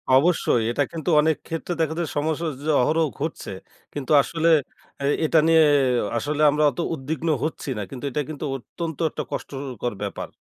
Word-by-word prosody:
অবশ্যই। 150 Hz, -5 st, +3 dB
এটা 145 Hz, -, +1 dB
কিন্তু 165 Hz, -1 st, -4 dB
অনেক 160 Hz, +1 st, +2 dB
ক্ষেত্রে 165 Hz, +2 st, -3 dB
দেখা 160 Hz, -1 st, +1 dB
যায় 165 Hz, -, -1 dB
সমস্যা 160 Hz, +2 st, -1 dB, 0.2 s
যে -, -, -1 dB
অহরহ 160 Hz, +5 st, +2 dB
ঘটছে। 155 Hz, +2 st, -4 dB, 0.4 s
কিন্তু 145 Hz, -1 st, -5 dB
আসলে 165 Hz, +3 st, 0 dB, 0.6 s
এই 145 Hz, -, +3 dB
এটা 160 Hz, +1 st, +4 dB
নিয়ে 165 Hz, -1 st, +6 dB, 0.5 s
আসলে 145 Hz, +5 st, -2 dB
আমরা 150 Hz, +1 st, +1 dB
অত -, -, -10 dB
উদ্বিগ্ন 160 Hz, +3 st, -4 dB, 0.2 s
হচ্ছি 155 Hz, -2 st, -3 dB
না। -, -, -2 dB
কিন্তু 135 Hz, 0 st, -9 dB
এটা 150 Hz, -, -1 dB
কিন্তু 155 Hz, 0 st, -5 dB
অত্যন্ত 160 Hz, +4 st, -6 dB
একটা -, -, -4 dB
কষ্টকর 130 Hz, -4 st, -4 dB
ব্যাপার। -, -, -5 dB
155 Hz, 165 wpm, -24 LUFS, 140-160 Hz, 0.6 s, নিয়ে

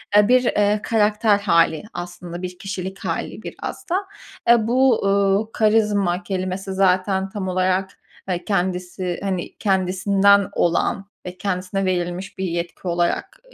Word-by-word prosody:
eee, 205 Hz, 0 st, +6 dB
bir, 255 Hz, 0 st, +5 dB
eee, 210 Hz, -3 st, +2 dB
karakter 210 Hz, -1 st, +2 dB
hâli 170 Hz, -5 st, +2 dB
aslında, 175 Hz, 0 st, -7 dB
bir 180 Hz, 0 st, -6 dB
kişilik 195 Hz, -1 st, -5 dB
hâli -, -, -4 dB
biraz -, -, -7 dB
da. 345 Hz, -, +1 dB, 0.5 s
Aaa, 235 Hz, -2 st, +4 dB
bu, 250 Hz, -2 st, +3 dB
ııı, 200 Hz, +2 st, +2 dB
karizma 210 Hz, -4 st, +2 dB
kelimesi 190 Hz, +1 st, -3 dB
zaten 190 Hz, 0 st, +2 dB
tam 190 Hz, -1 st, -4 dB
olarak, 185 Hz, +1 st, +1 dB, 0.4 s
eee, 180 Hz, -1 st, -2 dB
kendisi, 180 Hz, -2 st, -2 dB
hani, 190 Hz, -3 st, -3 dB
kendisinden 195 Hz, +1 st, +3 dB
olan 185 Hz, +3 st, 0 dB, 0.2 s
ve 180 Hz, 0 st, -7 dB
kendisine 190 Hz, 0 st, -2 dB
verilmiş 180 Hz, +1 st, -2 dB
bir 190 Hz, -, -3 dB
yetki 170 Hz, +1 st, -4 dB
olarak 175 Hz, -, -1 dB
190 Hz, 135 wpm, -21 LUFS, 180-205 Hz, 0.5 s, eee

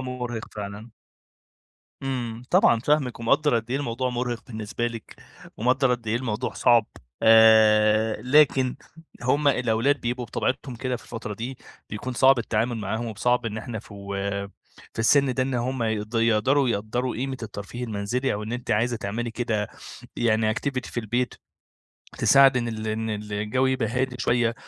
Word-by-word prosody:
مُرهق 125 Hz, -3 st, -5 dB
فعلًا. 105 Hz, +2 st, -7 dB, 1.1 s
إمم، 120 Hz, -3 st, -3 dB
طبعًا 145 Hz, -, +4 dB
فاهمِك 135 Hz, -4 st, 0 dB
ومقدر 140 Hz, +4 st, +2 dB
قدّ 115 Hz, +1 st, -4 dB
إيه 130 Hz, -, +1 dB
الموضوع 130 Hz, -2 st, -2 dB
مُرهق 120 Hz, -1 st, -3 dB
بالنسبة 110 Hz, 0 st, -4 dB
لِك، 115 Hz, -2 st, -7 dB, 0.4 s
ومقدر 130 Hz, +3 st, +2 dB
قدّ 120 Hz, -2 st, -12 dB
إيه 115 Hz, -, +1 dB
الموضوع 120 Hz, -1 st, -3 dB
صعب. 115 Hz, -3 st, +4 dB, 0.4 s
آآ، 110 Hz, -1 st, +5 dB
لكن 130 Hz, -1 st, +3 dB, 0.5 s
هُم 140 Hz, +3 st, +2 dB
الأولاد 125 Hz, +2 st, +1 dB
بيبقوا 120 Hz, +1 st, -2 dB
بطبيعتهم 130 Hz, +3 st, -2 dB
كده 130 Hz, +1 st, -2 dB
في -, -, -15 dB
الفترة 115 Hz, -3 st, -6 dB
دي 120 Hz, +5 st, -6 dB, 0.3 s
بيكون 115 Hz, +5 st, -5 dB
صعب 130 Hz, +1 st, +5 dB
التعامل 115 Hz, +1 st, -1 dB
معاهم، 110 Hz, +2 st, -3 dB
وصعب 120 Hz, +2 st, 0 dB
إن 110 Hz, 0 st, -3 dB
إحنا 110 Hz, -1 st, -6 dB
في 105 Hz, -, -12 dB
و 100 Hz, 0 st, -7 dB, 0.8 s
في -, -, -15 dB
السن 130 Hz, +3 st, +3 dB
ده 130 Hz, -, +1 dB
إن 130 Hz, 0 st, -2 dB
هُم 125 Hz, +1 st, -1 dB
يقد 110 Hz, 0 st, -2 dB
يقدروا 115 Hz, +4 st, +3 dB
يقدّروا 115 Hz, +4 st, -2 dB
قيمة 130 Hz, +1 st, -3 dB
الترفيه 110 Hz, +3 st, -6 dB
المنزلي 115 Hz, +5 st, -2 dB
أو 105 Hz, +1 st, -3 dB
إن 110 Hz, +2 st, -5 dB
أنتِ 120 Hz, -1 st, -5 dB
عايزة 115 Hz, +3 st, +1 dB
تعملي 115 Hz, +3 st, -4 dB
كده 115 Hz, -3 st, -2 dB, 0.5 s
يعني 110 Hz, -2 st, +2 dB
activity 130 Hz, -1 st, -3 dB
في 120 Hz, -, -3 dB
البيت 120 Hz, +3 st, -1 dB, 0.8 s
تساعد 135 Hz, -2 st, +6 dB
إن 120 Hz, -1 st, 0 dB
ال 110 Hz, -1 st, -5 dB
إن 110 Hz, +1 st, -2 dB
الجو 105 Hz, +4 st, -1 dB
يبقى 130 Hz, -4 st, 0 dB
هادي 125 Hz, +2 st, -1 dB
شوية. 120 Hz, -1 st, +1 dB
120 Hz, 160 wpm, -25 LUFS, 110-125 Hz, 1.1 s, تساعد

